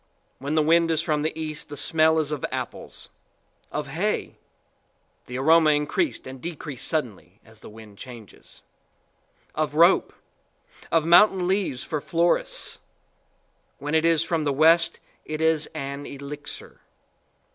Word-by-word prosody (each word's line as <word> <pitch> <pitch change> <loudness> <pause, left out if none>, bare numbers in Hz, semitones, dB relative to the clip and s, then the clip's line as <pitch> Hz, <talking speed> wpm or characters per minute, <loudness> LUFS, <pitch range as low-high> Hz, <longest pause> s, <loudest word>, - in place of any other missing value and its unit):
When 140 +3 -3
the 155 - +4
wind 165 +2 +4
is 165 0 +1
from 150 -3 0
the 155 +1 -2
east, 155 -1 -5
the 145 - -7
smell 160 +2 +3
is 155 -2 0
of 150 -3 -4
apples; - - -6 0.6
of - - -3
hay, - - -2 0.9
the 125 - -5
aroma 160 +3 +5
increased 150 - -1
and 130 -1 -9
decreased 150 -5 -5
suddenly 115 - -4
as 110 -1 -16
the - - -12
wind 110 -2 -14
changes; 120 -5 -12 0.9
of 150 -1 -2
rope; 170 +4 +5 0.8
of 165 -2 +3
mountain 180 +1 +5
leaves 185 -9 -1
for 155 -2 -3
florists. 170 +3 0 1.0
When 145 +2 -5
it 160 0 +3
is 165 -1 +3
from 165 -1 -1
the 145 - 0
west, 165 +4 +4 0.2
it 155 0 -5
is 160 -1 +2
an 140 +1 -5
elixir. 140 +1 -9
155 Hz, 140 wpm, -25 LUFS, 140-165 Hz, 1.0 s, aroma